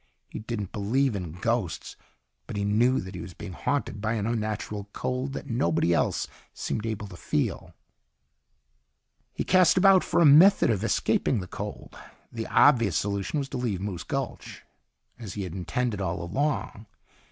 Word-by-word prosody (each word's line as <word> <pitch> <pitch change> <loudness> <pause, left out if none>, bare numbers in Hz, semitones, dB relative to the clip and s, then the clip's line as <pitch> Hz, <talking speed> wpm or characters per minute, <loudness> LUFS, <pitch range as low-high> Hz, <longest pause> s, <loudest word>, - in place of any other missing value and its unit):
He - - -6
didn't 105 -3 -5
believe 115 +4 0
in 90 -5 -5
ghosts. 105 +1 -2 0.5
But - - -6
he 100 0 -1
knew 120 +5 +3
that 95 +1 -8
he 90 - -6
was 85 0 -9
being 105 -3 -8
haunted 105 -2 -2
by 110 +1 0
an 105 -3 -1
unnatural 105 -2 -3
cold 130 +2 -3
that - - -6
nobody 85 -7 +1
else - - 0 0.3
seemed 110 - -3
able 110 -1 -3
to 95 - -11
feel. - - -2 1.6
He - - -3
cast 185 -1 +4
about 190 0 +6
for - - +1
a 170 - +6
method 160 +2 +7
of 105 -2 -1
escaping 115 +1 +1
the 90 - -5
cold. - - -7 0.4
The 115 -1 -5
obvious 115 - +4
solution 100 +6 -2
was 140 -2 -2
to - - -4
leave 115 -7 -1
Moose 95 -3 -4
Gulch, - - -5 0.6
as 110 -5 -7
he 100 - -3
had 90 -3 -6
intended 100 +4 -2
all 85 -1 -2
along. 130 - -2
110 Hz, 165 wpm, -27 LUFS, 95-125 Hz, 1.6 s, method